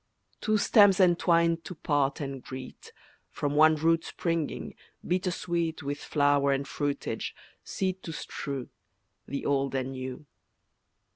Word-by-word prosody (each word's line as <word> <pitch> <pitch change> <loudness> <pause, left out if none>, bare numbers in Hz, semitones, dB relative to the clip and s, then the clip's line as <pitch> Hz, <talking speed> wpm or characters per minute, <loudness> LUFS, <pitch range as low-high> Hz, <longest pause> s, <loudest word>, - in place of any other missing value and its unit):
Two 215 0 +2
stems 205 -2 +5
entwined 170 -2 +3
to 180 - -7
part 145 -3 0
and 135 -2 -4
greet, 130 -1 -9 0.4
From 145 0 -2
one 155 +1 +6
root 165 +2 +2
springing, 155 - -3 0.3
bitter 180 +1 +1
sweet 170 -2 -2
With 140 +1 -3
flower 145 -2 +2
and 135 0 -1
fruitage, 145 0 -3 0.3
seed 190 -1 -2
to 165 - -6
strew, 140 -4 -5 0.6
The 140 - -4
Old 135 -1 +1
and 130 0 -1
New. 130 +2 -6
150 Hz, 130 wpm, -28 LUFS, 140-170 Hz, 0.6 s, one